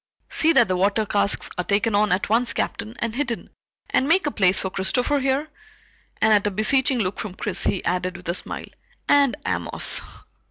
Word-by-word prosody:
"See 320 - +3
that 240 -5 +4
the 185 - -1
water 200 +4 +1
casks 200 -1 +1
are - - +1
taken 205 +4 0
on 210 0 +2
at 185 +2 0
once, 230 +3 +2
Captain, 220 +2 -4
and 230 -4 -3
hidden, 240 -3 -4 0.4
and 265 - +1
make 375 +4 +3
a 295 - -1
place 190 -5 +2
for 190 - -3
Christopher, 250 +10 0
here," 270 +3 -1 0.7
and 220 0 +4
at 205 -1 +3
a - - +2
beseeching 255 +6 +1
look 195 -4 -2
from 210 -5 -6
Chris - - -2
he 190 - -1
added 180 +1 -2
with 180 - -12
a 170 - 0
smile, - - -3 0.4
"and 280 -3 +3
Amos." - - +3
215 Hz, 195 wpm, -22 LUFS, 195-260 Hz, 0.7 s, that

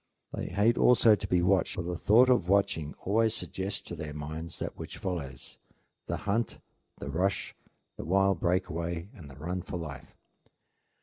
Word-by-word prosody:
They - - -3
hate 105 +5 +2
also 120 -2 +6
to 105 -1 -1
be 90 -2 +2
watched; 95 -1 +2
for 90 - -3
the 90 +1 -3
thought 110 +8 +5
of 125 -9 +3
watching 95 -7 +1
always 110 +3 +2
suggests 100 0 -3
to 85 - -7
their 75 -2 -6
minds 80 +2 -5
that - - -4
which - - -8
follows, 70 -9 -5 0.5
the - - -1
hunt, 110 +3 0 0.4
the 70 - -6
rush, 95 +5 0 0.4
the - - -6
wild 95 +1 +3
break 90 +2 +1
away, 85 +2 -4
and 85 - -12
the 70 - -13
run 90 +5 -3
for 90 - -5
life. 75 -6 -8
90 Hz, 175 wpm, -30 LUFS, 80-100 Hz, 0.5 s, also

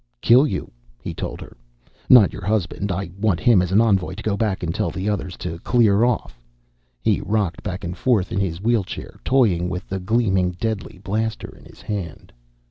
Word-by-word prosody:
"Kill 125 - +5
you," - - -4 0.3
he - - -6
told - - -5
her. - - -11 0.5
"Not 120 -7 +7
your - - -8
husband. 100 0 -1
I 90 -1 -3
want 100 -5 +1
him 115 -7 +5
as 90 0 -2
an 100 - +4
envoy, 95 -5 +2
to 110 - -8
go 105 -2 0
back 100 -3 -1
and 85 -1 -1
tell - - -1
the 95 +2 -4
others 100 -3 -2
to 85 -1 -5
clear 110 0 +3
off." 120 - -1 0.6
He - - +2
rocked 100 -5 -1
back 95 -1 -5
and 85 0 -4
forth 110 -7 +1
in - - -1
his 90 -4 -2
wheelchair, 110 -1 -2
toying 100 -10 +2
with 90 +1 -5
the 95 - -3
gleaming, 95 -3 +1
deadly 110 -5 -3
blaster 110 +4 -3
in - - -18
his - - -16
hand. 95 -7 -6
100 Hz, 195 wpm, -22 LUFS, 90-110 Hz, 0.6 s, Not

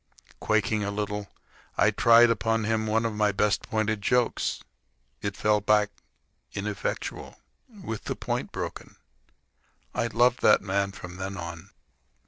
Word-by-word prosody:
Quaking 110 0 +1
a 100 - -1
little, 105 0 -3 0.5
I 110 - +4
tried 115 +2 +6
upon 115 0 0
him 110 0 0
one 110 +2 +1
of 115 - -1
my 105 -1 +2
best 100 0 +1
pointed 110 -1 -1
jokes. 125 +3 0 0.6
It 100 -1 -3
fell 105 0 +2
back 105 0 +3 0.6
ineffectual, 100 -1 -4 0.3
with 190 - -7
the - - -2
point - - -3
broken. - - -6 1.0
I 115 - 0
loved 120 +2 +2
that - - +5
man 100 0 0
from 90 -2 -9
then 95 +1 -5
on. 85 -1 -7
105 Hz, 135 wpm, -27 LUFS, 100-115 Hz, 1.0 s, tried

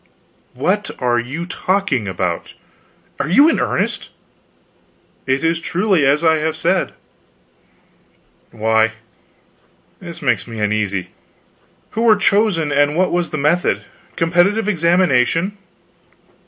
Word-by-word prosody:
"What 185 +11 -1
are 120 -2 +1
you 135 +8 -5
talking 180 - -1
about? 90 -2 -3 0.6
Are 145 - -2
you 280 - +6
in 325 - +2
earnest?" - - -2 1.2
"It 130 +3 0
is 165 0 +1
truly 180 -3 +1
as 145 +4 +2
I 160 -1 +4
have 160 +1 -2
said." - - 0 1.6
"Why, 110 0 +1 1.1
this 170 -2 -9
makes 125 -3 0
me 115 -2 -7
uneasy. 105 -3 -1 0.8
Who 225 - -3
were 230 -2 +5
chosen, 200 -7 +1
and 145 +2 +2
what 185 0 +2
was 175 0 -1
the 155 - -4
method? 155 +5 +1 0.3
Competitive 175 +6 +2
examination?" 170 -1 +2
160 Hz, 115 wpm, -18 LUFS, 125-185 Hz, 1.6 s, you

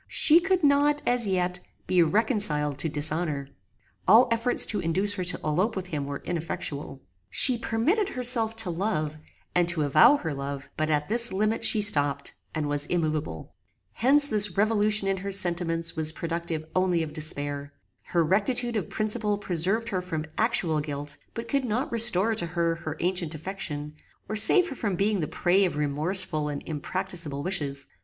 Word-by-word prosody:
She 320 +2 +4
could 375 -1 -1
not, 290 +1 +2
as 245 -3 0
yet, 180 -1 -1 0.3
be 180 -1 +2
reconciled 165 - 0
to 160 - -1
dishonor. 150 -1 0 0.6
All 235 +4 +6
efforts 230 +2 +3
to 210 - -2
induce 190 +5 -1
her 190 -3 -4
to 175 - -1
elope 180 +9 -1
with 190 -2 -4
him 145 -4 -4
were 140 0 -7
ineffectual. 155 -5 -5 0.3
She 255 - +5
permitted 295 - -1
herself 240 - 0
to 225 -5 0
love, 165 -4 -3 0.4
and 175 -1 +2
to 165 -3 +2
avow 155 - +5
her 160 - -5
love; 140 0 -6
but 155 0 -2
at 150 -1 0
this 235 +2 +4
limit 215 +4 -1
she 210 - +4
stopped, 145 -8 +3 0.2
and 155 -2 -2
was 145 0 0
immoveable. 155 - -3 0.4
Hence 285 +4 +4
this 210 -6 +2
revolution 210 -1 +2
in 195 0 0
her 195 +1 -6
sentiments 170 -3 +2
was 155 -1 +2
productive 165 -1 -4
only 180 -2 +1
of 150 -1 -8
despair. 145 -2 -2 0.3
Her 170 -1 0
rectitude 225 +7 0
of 195 - -4
principle 215 -1 -1
preserved 195 +4 -1
her 185 -3 -2
from 160 -4 -5
actual 175 -9 +1
guilt, 145 -1 -6 0.2
but 230 0 -6
could 275 +1 -1
not 245 +4 -3
restore 225 -2 +3
to 190 -6 -1
her 170 0 -1
her 160 -2 -7
ancient 175 -3 -1
affection, 155 -3 -6 0.3
or 215 - -4
save 350 - +6
her 275 - -7
from 205 -6 -3
being 200 +2 0
the 155 - -2
prey 185 +6 +1
of 180 -5 -2
remorseful 150 +2 +1
and 145 -1 -6
impracticable 155 -2 -4
wishes. 145 -7 -3
180 Hz, 170 wpm, -25 LUFS, 155-215 Hz, 0.6 s, All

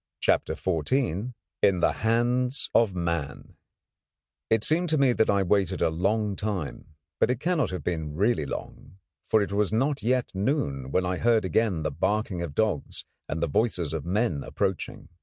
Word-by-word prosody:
CHAPTER - - +1
XIV 110 - -1 0.3
IN 95 -3 +4
THE - - +3
HANDS 120 +4 0
OF 110 -5 +3
MAN 85 -5 -3 1.0
It 110 -1 +3
seemed 170 +3 +2
to 155 - +2
me 135 -3 +4
that 110 - +2
I 100 -1 +3
waited 95 0 +1
a - - +2
long 100 +5 0
time; 90 -6 -4 0.2
but - - +3
it 125 -2 0
cannot 155 - +1
have 90 - -5
been 80 -4 -3
really 100 -4 +1
long, 95 - -8 0.3
for 110 -2 +4
it 100 - -5
was 100 -1 +1
not 135 +5 +1
yet 125 +3 0
noon 95 - -1
when 90 +6 +1
I 90 0 -1
heard 115 -3 +3
again 95 -4 +1
the 75 - -1
barking 100 +4 -1
of 80 -4 -5
dogs, 110 -9 -1 0.2
and 80 +1 -2
the - - +2
voices 85 -2 0
of 80 -3 -3
men 90 -5 0
approaching. 95 -4 -3
100 Hz, 175 wpm, -27 LUFS, 85-115 Hz, 1.0 s, IN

